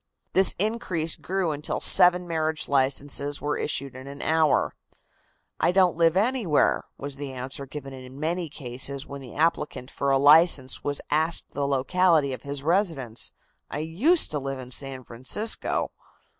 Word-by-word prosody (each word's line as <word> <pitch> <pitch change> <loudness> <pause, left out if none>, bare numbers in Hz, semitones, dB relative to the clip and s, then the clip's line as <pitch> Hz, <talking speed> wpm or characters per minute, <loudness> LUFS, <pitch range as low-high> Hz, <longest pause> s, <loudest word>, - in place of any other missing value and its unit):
This 190 0 +5
increase 190 -6 -1
grew 185 -3 -2
until 150 0 -3
seven 180 0 +5
marriage 160 -1 -1
licenses 140 +1 0
were 145 0 -2
issued 140 -2 -3
in 130 +1 -10
an 140 0 -8
hour. 160 -2 +2 0.9
"I - - +3
don't 180 -3 +3
live 165 +1 +3
anywhere," 215 - +1
was 140 0 -7
the 140 -1 -6
answer 130 +2 -6
given 135 0 -8
in 130 +1 -11
many 165 +2 -2
cases 135 0 -3
when 140 0 -9
the 125 -3 -11
applicant 150 -5 -1
for 140 - -2
a 135 - +4
license 145 -1 +5
was 145 0 -2
asked 160 +2 +2
the 140 0 -2
locality 145 +1 +2
of 130 - -7
his 140 -1 -5
residence. 160 - 0 0.4
"I - - -5
used 195 - +2
to 150 - -1
live 135 0 -5
in 125 -1 -9
San 135 0 -3
Francisco." 130 - -1
145 Hz, 155 wpm, -25 LUFS, 135-170 Hz, 0.9 s, This